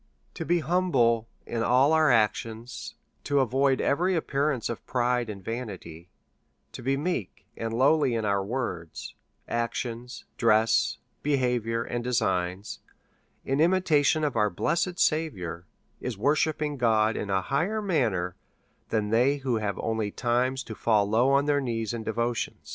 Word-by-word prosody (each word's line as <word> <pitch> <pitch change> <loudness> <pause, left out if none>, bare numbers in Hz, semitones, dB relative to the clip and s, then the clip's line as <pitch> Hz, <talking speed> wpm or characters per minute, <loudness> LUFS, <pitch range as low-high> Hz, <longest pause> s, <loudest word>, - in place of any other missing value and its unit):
To - - -5
be 175 0 +2
humble 135 -9 +2 0.2
in 115 - -3
all 130 +6 +4
our 160 -1 +4
actions, 115 0 -1 0.3
to 145 -1 +1
avoid 135 +1 +2
every 180 +5 +1
ap 160 - -2
pearance 140 -3 0
of 115 - -5
pride 125 -1 0
and 100 -3 -7
vanity, 95 -8 -6 0.6
to - - -8
be 135 +3 0
meek 145 - -3
and 115 0 -4
lowly 135 +1 +3
in 110 -1 -1
our 100 -1 +1
words, 95 -8 -4 0.3
actions, 120 +1 -4
dress, 110 -1 +3 0.2
behaviour, 125 -5 0
and 120 0 -4
designs, 95 -6 -1 0.7
in 135 +1 0
imitation 160 -4 +3
of 145 -4 0
our 105 -2 +3
blessed 175 - -1
Saviour; 90 - -1 0.3
is 125 -5 -4
worshipping 150 +4 +1
God 110 -3 +2
in 100 - -4
a 95 -1 +1
higher 175 - 0
manner 115 - 0 0.5
than 105 -2 0
they 125 +5 +3
who 130 -4 -1
have 105 -3 -2
only 110 -2 -1
time 125 +4 0
to 130 -4 -6
fall 105 -2 +2
low 115 +5 +3
on 140 +1 +3
their 145 -1 +2
knees 115 -4 -2
in 115 -1 -4
devotion. 115 +2 -2
120 Hz, 150 wpm, -27 LUFS, 110-140 Hz, 0.7 s, all